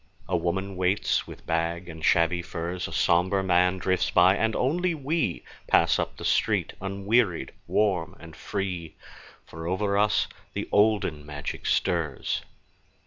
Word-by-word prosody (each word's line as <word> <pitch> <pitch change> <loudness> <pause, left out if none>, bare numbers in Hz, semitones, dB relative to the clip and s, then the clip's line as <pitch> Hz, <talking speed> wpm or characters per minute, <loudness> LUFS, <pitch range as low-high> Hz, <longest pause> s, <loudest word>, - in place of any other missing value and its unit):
A 95 - 0
woman 95 +3 -2
waits 95 +3 +1
with - - -11
bag 85 +2 -1
and 80 -2 -9
shabby 85 +2 +3
furs, 85 +1 -4
A - - -9
somber 95 +3 +2
man 90 0 +3
drifts 95 0 0
by, 90 +2 +5
and 110 +1 0
only 170 +6 +1
we 145 - -1 0.2
Pass - - +4
up - - -3
the - - -7
street - - +1
unwearied, 100 0 0 0.2
warm 95 -6 +1
and 80 -2 -12
free, 90 -5 -4 0.5
For 80 +1 -8
over 100 +2 0
us 105 0 +2 0.3
the - - -3
olden 105 -8 +2
magic 75 -1 -6
stirs. 80 -6 0
90 Hz, 140 wpm, -26 LUFS, 85-100 Hz, 0.5 s, by